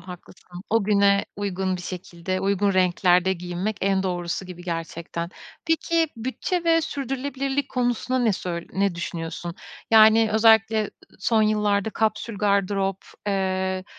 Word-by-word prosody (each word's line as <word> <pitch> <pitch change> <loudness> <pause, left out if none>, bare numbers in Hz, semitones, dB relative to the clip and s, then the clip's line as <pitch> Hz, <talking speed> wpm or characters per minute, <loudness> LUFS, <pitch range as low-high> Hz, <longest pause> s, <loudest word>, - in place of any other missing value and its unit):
haklısın. 180 0 -12
O 225 -2 +2
güne 200 -1 +3
uygun 190 -2 -2
bir 180 - -8
şekilde, 180 0 -5
uygun 200 +1 +1
renklerde 180 0 +3
giyinmek 180 +3 -3
en 195 0 +1
doğrusu 175 0 -3
gibi 175 -1 -9
gerçekten. 170 0 -4 0.4
Peki 325 0 +1
bütçe 260 +9 -3
ve 330 0 +4
sürdürülebilirlik 275 -1 -3
konusunda 250 +1 0
ne 235 -4 +2
söy 175 -2 -4
ne 195 -2 +1
düşünüyorsun? 170 0 -5 0.4
Yani, 220 0 +6
özellikle, 220 0 +5
eee, 210 - -5 0.3
son 220 +3 +2
yıllarda 210 -1 +1
kapsül 215 -1 -1
gardırop, 200 -1 +1 0.3
eee, 190 -1 -1
200 Hz, 130 wpm, -24 LUFS, 180-220 Hz, 0.4 s, Yani